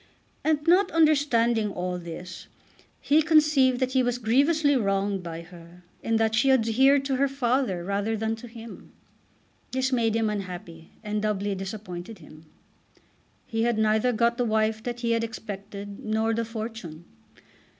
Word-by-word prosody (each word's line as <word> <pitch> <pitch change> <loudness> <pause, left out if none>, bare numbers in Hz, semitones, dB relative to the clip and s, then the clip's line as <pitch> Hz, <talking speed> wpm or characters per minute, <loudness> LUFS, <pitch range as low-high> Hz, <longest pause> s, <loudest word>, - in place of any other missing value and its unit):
And, 305 -1 +1
not 365 +4 +5
understanding 245 -9 +3
all 180 -1 -3
this, 175 +2 -9 0.5
he 300 +2 +4
conceived 300 -5 +4
that 255 -1 0
he 260 0 +3
was 245 -1 0
grievously 285 +6 +2
wronged 195 -3 0
by 165 -1 -6
her 175 0 -15 0.2
in 225 - 0
that 225 0 +2
she 255 +5 +3
adhered 265 +3 +4
to 270 -1 0
her 280 +1 +3
father 255 -8 0
rather 200 +4 -1
than 220 +1 -1
to 240 - -10
him. 230 -1 -12 0.8
This 260 +1 0
made 230 -3 +1
him 225 -1 +1
unhappy, 180 -5 -6
and 210 0 -2
doubly 205 -1 -1
disappointed 195 0 -7
him. 155 -1 -16 1.0
He 225 -2 -2
had 235 -1 +1
neither 220 +3 +2
got 235 +1 +1
the - - +3
wife 220 0 +1
that 240 +1 -5
he 235 -1 0
had 230 0 +1
expected 205 -2 -7
nor 220 +1 0
the 230 +1 -1
fortune. 220 -8 -7
225 Hz, 155 wpm, -26 LUFS, 200-255 Hz, 1.0 s, not